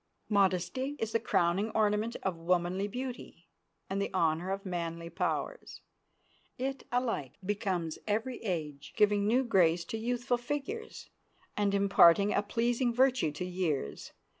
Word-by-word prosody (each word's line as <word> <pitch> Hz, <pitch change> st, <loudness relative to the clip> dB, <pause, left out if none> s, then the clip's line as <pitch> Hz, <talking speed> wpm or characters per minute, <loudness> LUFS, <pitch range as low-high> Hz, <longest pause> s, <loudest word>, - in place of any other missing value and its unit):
Modesty 200 Hz, +7 st, +1 dB
is 225 Hz, 0 st, -2 dB
the 230 Hz, -, +2 dB
crowning 190 Hz, 0 st, +1 dB
ornament 215 Hz, +2 st, +1 dB
of 190 Hz, -2 st, -1 dB
womanly 175 Hz, +3 st, 0 dB
beauty, 245 Hz, -7 st, -7 dB, 0.4 s
and 195 Hz, +1 st, -2 dB
the 200 Hz, -, -1 dB
honor 165 Hz, +1 st, +1 dB
of 195 Hz, +1 st, -3 dB
manly 170 Hz, -2 st, -4 dB
powers. 185 Hz, -, -3 dB, 0.8 s
It 270 Hz, +1 st, -4 dB
alike 240 Hz, -, -1 dB
becomes 185 Hz, -5 st, -2 dB
every 225 Hz, +4 st, -1 dB
age, 155 Hz, -9 st, -4 dB
giving 205 Hz, -1 st, +3 dB
new 250 Hz, +4 st, +3 dB
grace 175 Hz, -7 st, +3 dB
to 225 Hz, -, -4 dB
youthful 245 Hz, +1 st, -1 dB
figures, 290 Hz, -, -5 dB, 0.4 s
and 200 Hz, -1 st, +1 dB
imparting 200 Hz, 0 st, +5 dB
a -, -, +2 dB
pleasing 235 Hz, +4 st, 0 dB
virtue 250 Hz, -, +3 dB
to 165 Hz, +4 st, -4 dB
years. 175 Hz, -, -2 dB
200 Hz, 135 wpm, -31 LUFS, 175-235 Hz, 0.8 s, imparting